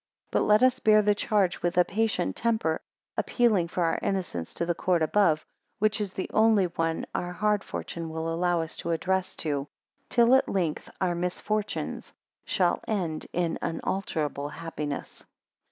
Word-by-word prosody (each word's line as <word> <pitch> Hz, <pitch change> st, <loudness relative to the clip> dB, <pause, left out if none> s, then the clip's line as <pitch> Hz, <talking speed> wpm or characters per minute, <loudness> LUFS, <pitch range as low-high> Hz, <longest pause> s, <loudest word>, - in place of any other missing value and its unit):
3 -, -, +2 dB
But -, -, +1 dB
let 210 Hz, +3 st, +5 dB
us 255 Hz, -1 st, +4 dB
bear 215 Hz, -1 st, +5 dB
the 210 Hz, 0 st, +4 dB
charge 205 Hz, -3 st, +1 dB
with 175 Hz, +1 st, -1 dB
a 180 Hz, -, +6 dB
patient 210 Hz, -, 0 dB
temper, 220 Hz, -9 st, 0 dB, 0.4 s
appealing 215 Hz, -8 st, +2 dB
for 175 Hz, +1 st, -1 dB
our 165 Hz, -, +1 dB
innocence 175 Hz, -, -2 dB
to 170 Hz, -, -1 dB
the 175 Hz, -, +1 dB
court 175 Hz, -1 st, +1 dB
above, 160 Hz, -2 st, +3 dB, 0.3 s
which 215 Hz, 0 st, +1 dB
is 200 Hz, -2 st, -2 dB
the 190 Hz, -, -3 dB
only 220 Hz, -3 st, +5 dB
one 165 Hz, -1 st, -1 dB
our 175 Hz, -, -2 dB
hard 210 Hz, +2 st, +1 dB
fortune 165 Hz, -1 st, -5 dB
will 160 Hz, +1 st, -3 dB
allow 175 Hz, 0 st, +1 dB
us 160 Hz, -, -7 dB
to -, -, -5 dB
address 190 Hz, +3 st, 0 dB
to, 145 Hz, -3 st, -2 dB, 0.4 s
till 235 Hz, 0 st, +5 dB
at 265 Hz, -, +4 dB
length 170 Hz, -6 st, -1 dB
our 185 Hz, -2 st, +1 dB
misfortunes 195 Hz, +4 st, -3 dB, 0.3 s
shall 180 Hz, -3 st, +2 dB
end 175 Hz, -8 st, -2 dB
in 170 Hz, -2 st, -1 dB
unalterable 155 Hz, -5 st, -2 dB
happiness. 150 Hz, -3 st, -5 dB
180 Hz, 165 wpm, -27 LUFS, 165-210 Hz, 0.4 s, a